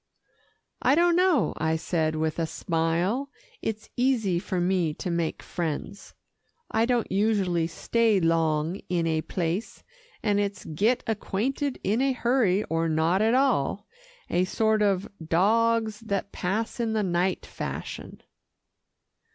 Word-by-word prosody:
"I 260 Hz, -, +4 dB
don't 345 Hz, +1 st, +4 dB
know," 360 Hz, -, +3 dB
I 160 Hz, +1 st, +1 dB
said 160 Hz, -1 st, -1 dB
with 155 Hz, +1 st, -1 dB
a 165 Hz, -, 0 dB
smile. 170 Hz, -, -1 dB, 0.3 s
"It's 220 Hz, -1 st, -4 dB
easy 235 Hz, -8 st, +1 dB
for 185 Hz, 0 st, -3 dB
me 175 Hz, -3 st, +1 dB
to 180 Hz, -, -4 dB
make 170 Hz, -1 st, -2 dB
friends. 170 Hz, +4 st, -5 dB, 0.6 s
I 225 Hz, +1 st, +2 dB
don't 245 Hz, -2 st, 0 dB
usually 195 Hz, -5 st, +1 dB
stay 225 Hz, +4 st, +1 dB
long 165 Hz, 0 st, +1 dB
in 175 Hz, -2 st, +1 dB
a 160 Hz, -1 st, +1 dB
place, 175 Hz, +5 st, -3 dB, 0.4 s
and 205 Hz, -2 st, +2 dB
it's 200 Hz, 0 st, -2 dB
get 215 Hz, +11 st, +1 dB
acquainted 245 Hz, +6 st, -2 dB
in 215 Hz, +5 st, +1 dB
a 270 Hz, 0 st, +2 dB
hurry, 235 Hz, -6 st, +2 dB
or 165 Hz, 0 st, -1 dB
not 160 Hz, +5 st, +2 dB
at 225 Hz, +3 st, +3 dB
all 230 Hz, -, +1 dB, 0.4 s
a 180 Hz, +1 st, +1 dB
sort 220 Hz, +3 st, +1 dB
of 200 Hz, -1 st, +2 dB, 0.2 s
'dogs 220 Hz, +6 st, +2 dB
that 200 Hz, -3 st, -3 dB
pass 215 Hz, +7 st, -2 dB
in 230 Hz, -2 st, 0 dB
the 215 Hz, -1 st, +1 dB
night' 180 Hz, 0 st, 0 dB
fashion." -, -, -6 dB
195 Hz, 135 wpm, -26 LUFS, 170-230 Hz, 0.6 s, I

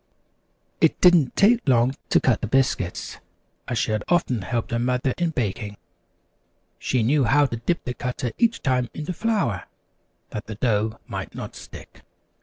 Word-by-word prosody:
It -, -, +3 dB
didn't 175 Hz, -7 st, +5 dB
take 220 Hz, -, +4 dB
long 125 Hz, +1 st, +3 dB
to -, -, +5 dB
cut 125 Hz, -5 st, +1 dB
the -, -, -2 dB
biscuits, 125 Hz, -7 st, 0 dB, 0.5 s
as 120 Hz, -, -2 dB
she 110 Hz, -, 0 dB
had 105 Hz, -1 st, -1 dB
often 155 Hz, -, +1 dB
helped 115 Hz, +3 st, -3 dB
her 115 Hz, -, 0 dB
mother 125 Hz, +1 st, 0 dB
in 175 Hz, -1 st, +1 dB
baking. 105 Hz, -6 st, -3 dB, 1.0 s
She 125 Hz, -3 st, 0 dB
knew 135 Hz, +3 st, +3 dB
how 145 Hz, +4 st, +4 dB
to 120 Hz, -4 st, -3 dB
dip 170 Hz, +9 st, -1 dB
the 125 Hz, -, -2 dB
cutter 125 Hz, -1 st, -3 dB
each 230 Hz, -1 st, +2 dB
time 125 Hz, -3 st, +1 dB
into 155 Hz, +4 st, -4 dB
flour, 195 Hz, -, -1 dB, 0.7 s
that 105 Hz, -, -6 dB
the 110 Hz, -, -6 dB
dough 110 Hz, -1 st, 0 dB
might -, -, -6 dB
not -, -, -7 dB
stick. -, -, -12 dB
125 Hz, 165 wpm, -24 LUFS, 115-150 Hz, 1.0 s, didn't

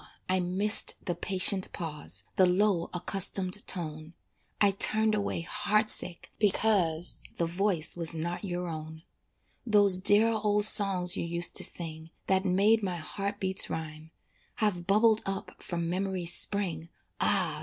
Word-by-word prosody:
I 185 Hz, 0 st, -1 dB
missed 190 Hz, +4 st, +3 dB
the 175 Hz, -, -3 dB
patient 190 Hz, +1 st, -1 dB
pause, 160 Hz, -3 st, -5 dB
The 185 Hz, -, +3 dB
low 180 Hz, -1 st, -1 dB
accustomed 185 Hz, +2 st, -2 dB
tone, 155 Hz, -2 st, -6 dB, 0.4 s
I 205 Hz, -1 st, +2 dB
turned 215 Hz, +2 st, +3 dB
away 205 Hz, -5 st, -3 dB
heart 210 Hz, +5 st, 0 dB
sick 175 Hz, -, -2 dB
because 190 Hz, -5 st, +2 dB
The 170 Hz, -, -2 dB
voice 175 Hz, -1 st, -1 dB
was 165 Hz, -1 st, +3 dB
not 170 Hz, +4 st, -6 dB
your 180 Hz, -2 st, -6 dB
own. 160 Hz, 0 st, -9 dB, 0.6 s
Those 205 Hz, -4 st, +4 dB
dear 205 Hz, +4 st, +3 dB
old 210 Hz, -1 st, +1 dB
songs 195 Hz, -4 st, +7 dB
you -, -, -5 dB
used 170 Hz, +1 st, +2 dB
to -, -, 0 dB
sing, 160 Hz, -1 st, -2 dB, 0.2 s
That 190 Hz, 0 st, -1 dB
made 200 Hz, +4 st, +1 dB
my 185 Hz, -3 st, -5 dB
heart 200 Hz, +5 st, -6 dB
beats 190 Hz, 0 st, +1 dB
rhyme, 155 Hz, 0 st, -8 dB, 0.5 s
Have 185 Hz, -5 st, -3 dB
bubbled 215 Hz, +2 st, +2 dB
up 195 Hz, 0 st, -7 dB
from 170 Hz, -1 st, -5 dB
memory's 185 Hz, -1 st, -3 dB
spring, 170 Hz, -6 st, -3 dB, 0.3 s
Ah! -, -, +1 dB
185 Hz, 145 wpm, -27 LUFS, 170-205 Hz, 0.6 s, songs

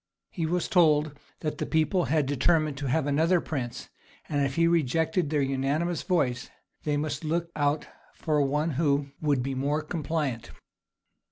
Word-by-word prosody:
He 165 Hz, -4 st, -2 dB
was 175 Hz, +1 st, 0 dB
told 155 Hz, -6 st, +3 dB, 0.2 s
that 155 Hz, -2 st, -3 dB
the -, -, -1 dB
people 160 Hz, +3 st, +1 dB
had 155 Hz, -1 st, +1 dB
determined 150 Hz, +2 st, +2 dB
to 140 Hz, -, -3 dB
have 145 Hz, +3 st, +1 dB
another 160 Hz, +5 st, +3 dB
prince; 125 Hz, -7 st, -5 dB, 0.4 s
and 145 Hz, -2 st, 0 dB
if 135 Hz, 0 st, -1 dB
he 165 Hz, 0 st, +4 dB
rejected 160 Hz, +1 st, +1 dB
their 150 Hz, -2 st, +1 dB
unanimous 140 Hz, +5 st, 0 dB
voice, 130 Hz, -10 st, 0 dB, 0.4 s
they 150 Hz, -1 st, +1 dB
must 150 Hz, 0 st, -3 dB
look 170 Hz, +2 st, -1 dB
out 145 Hz, 0 st, +1 dB, 0.3 s
for 150 Hz, -2 st, 0 dB
one 150 Hz, +4 st, +1 dB
who 140 Hz, -2 st, +1 dB
would 145 Hz, -5 st, +1 dB
be 135 Hz, +1 st, -2 dB
more 145 Hz, +4 st, -1 dB
compliant. 150 Hz, -6 st, -3 dB
150 Hz, 160 wpm, -27 LUFS, 140-165 Hz, 0.4 s, he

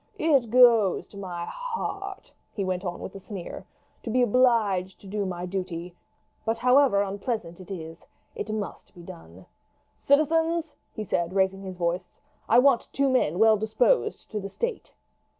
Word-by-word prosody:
It 275 Hz, -8 st, +2 dB
goes 230 Hz, -5 st, +5 dB
to 200 Hz, -, -13 dB
my 175 Hz, -3 st, -5 dB
heart," 400 Hz, -, -5 dB, 0.2 s
he 200 Hz, -, -3 dB
went 185 Hz, 0 st, -2 dB
on 175 Hz, -2 st, -4 dB
with -, -, -7 dB
a 195 Hz, -, -8 dB
sneer, 190 Hz, -2 st, -8 dB, 0.3 s
"to -, -, -6 dB
be 250 Hz, +2 st, +3 dB
obliged 215 Hz, -6 st, +2 dB
to 200 Hz, -, -13 dB
do 200 Hz, 0 st, -2 dB
my 180 Hz, -1 st, -4 dB
duty; 180 Hz, -2 st, -5 dB, 0.5 s
but 225 Hz, +1 st, 0 dB
however 250 Hz, -4 st, +4 dB
unpleasant 200 Hz, -2 st, -4 dB
it 185 Hz, -, -12 dB
is, 165 Hz, -3 st, -8 dB, 0.3 s
it 210 Hz, -, -5 dB
must 215 Hz, -1 st, -6 dB
be 175 Hz, -, -12 dB
done. 85 Hz, -, -12 dB, 0.5 s
Citizens," 320 Hz, +2 st, +1 dB, 0.2 s
he 215 Hz, -, -5 dB
said, 170 Hz, -3 st, -1 dB
raising 195 Hz, 0 st, +1 dB
his 190 Hz, -2 st, -7 dB
voice, 175 Hz, +1 st, -3 dB, 0.3 s
"I 230 Hz, -, +6 dB
want 255 Hz, -1 st, +4 dB
two 275 Hz, 0 st, +1 dB
men 215 Hz, -, +1 dB
well 220 Hz, +1 st, +5 dB
disposed 220 Hz, -, +1 dB
to 215 Hz, -, -2 dB
the 195 Hz, 0 st, -6 dB
state." 470 Hz, -, -4 dB
205 Hz, 165 wpm, -26 LUFS, 185-250 Hz, 0.5 s, I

